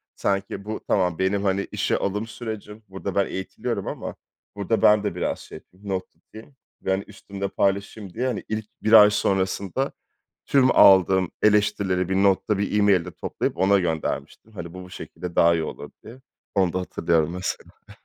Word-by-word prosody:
sanki 100 0 -2
bu 110 - -5
tamam, 90 -4 +1
benim, 100 +2 +1
hani, 100 0 0
işe - - 0
alım 105 +3 -2
sürecim, 110 -2 -7
burada 95 0 -6
ben 100 -1 +3
eğitiliyorum 95 0 -4
ama - - -5 0.4
burada 105 +2 -1
ben 105 0 +5
de 105 - -2
biraz - - -2
şey - - -12
yapayım, 100 +2 -14
not 95 -1 -2
tutayım 115 +6 -16 0.3
ve, 95 - -1
hani, 95 +1 0
üstümle 100 0 -6
paylaşayım 100 0 -2
diye, 125 +3 -1
hani, 125 - -3
ilk 110 0 -3 0.2
1 110 +1 +2
ay 105 -1 +10
sonrasında 100 +5 -1 0.6
tüm 130 -2 +4
aldığım 95 -1 +6
eleştirileri 105 -3 +2
bir 95 - 0
notta, 100 +1 +2
bir 100 +1 0
e-mail'de 95 -4 +3
toplayıp - - -3
ona 100 +1 +4
göndermiştim. 85 +5 -3
Hani, 85 -3 -8
bu, 90 - -8
bu 90 - -14
şekilde 90 -1 -8
daha 85 0 +5
iyi 80 - 0
olur - - -7
diye. 120 +4 -12 0.3
Onu 95 -3 +2
da 95 - -1
hatırlıyorum 85 -3 0
mesela. 90 +1 -4 0.2
Evet. - - -18
100 Hz, 175 wpm, -24 LUFS, 95-105 Hz, 0.6 s, ay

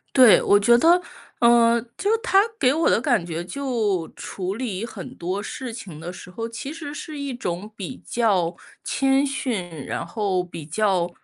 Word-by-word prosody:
对， 255 -5 +8
我 205 - +5
觉 235 +3 +6
得， 335 +8 +5 0.4
呃， 235 0 +5 0.2
就 410 +2 +1
他 445 -4 +2 0.2
给 255 +1 +4
我 325 +2 +2
的 - - +3
感 245 - +1
觉， 170 -1 -4
就 215 -6 -1
处 190 0 -5
理 225 -5 -3
很 210 -6 -8
多 185 +4 -3
事 250 +3 -6
情 195 -9 -9
的 170 +3 -6
时 180 - -11
候， 225 +5 -4
其 230 +4 -6
实 305 -2 -7
是 300 0 -7
一 280 -1 -3
种 210 -4 -4
比 215 +5 -6
较 195 -7 +1 0.3
谦 270 +1 +2
逊， 250 -10 -2 0.2
然 - - -3
后 195 -5 -1
比 165 -4 -9
较 180 0 +1
225 Hz, 185 characters per minute, -23 LUFS, 185-265 Hz, 0.4 s, 对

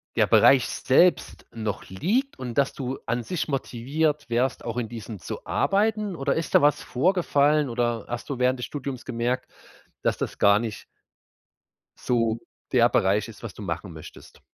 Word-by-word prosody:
der - - +3
Bereich 135 -2 +6
selbst 170 +7 +2
noch 110 -3 -4
liegt 215 - -1
und 125 -3 -6
dass 140 -1 +2
du 130 0 -4
an 120 - -1
sich 180 +7 -3
motiviert 145 +2 -1
wärst, 120 +2 0
auch 115 0 -4
in 120 -2 -1
diesem 110 -3 -8
zu - - -7
arbeiten? 210 -1 +1
Oder 135 -2 0
ist 165 -1 -3
da - - +7
was 145 -1 +3
vorgefallen? 150 -2 +2
Oder 120 -2 -1
hast 120 +4 -6
du 135 -3 -3
während 125 0 +2
des - - -3
Studiums 140 -3 -6
gemerkt, 120 +2 -2 0.5
dass - - +1
das - - -4
gar 100 +1 +5
nicht 115 -2 -5 1.1
so 115 -2 0 0.3
der - - +5
Bereich 100 +3 +2
ist, 115 0 -13
was 115 - -6
du - - -11
machen 90 -1 -5
möchtest? 80 - -13
125 Hz, 170 wpm, -25 LUFS, 115-145 Hz, 1.1 s, da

